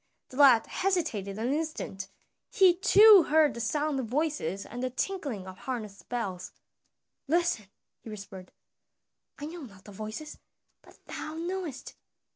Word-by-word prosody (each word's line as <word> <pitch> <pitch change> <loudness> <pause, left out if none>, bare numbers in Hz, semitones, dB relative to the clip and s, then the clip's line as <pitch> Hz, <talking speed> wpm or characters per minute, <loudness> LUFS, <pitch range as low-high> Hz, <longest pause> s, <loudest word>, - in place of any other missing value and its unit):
The 255 - -11
lad 265 -6 +7
hesitated 300 - -2
an 240 +5 -1
instant; 295 -11 -4 0.4
he 380 -6 +5
too 405 0 +7
heard 305 -2 +4
the - - -7
sound 295 +4 -1
of 250 - -3
voices 260 - -2
and 245 +2 -7
the 255 - -1
tinkling 260 - -3
of 185 0 -10
harness 215 -6 -6
bells. 190 -7 -5 0.8
"Listen," 325 - +1 0.3
he - - -11
whispered, 195 -3 -10 0.9
"I 290 - -6
know 335 +3 -8
not 200 -8 -12
the 205 - -12
voices, 215 +9 -7 0.4
but - - -19
thou 310 - -6
knowest." 340 -4 -5
265 Hz, 140 wpm, -29 LUFS, 210-320 Hz, 0.9 s, lad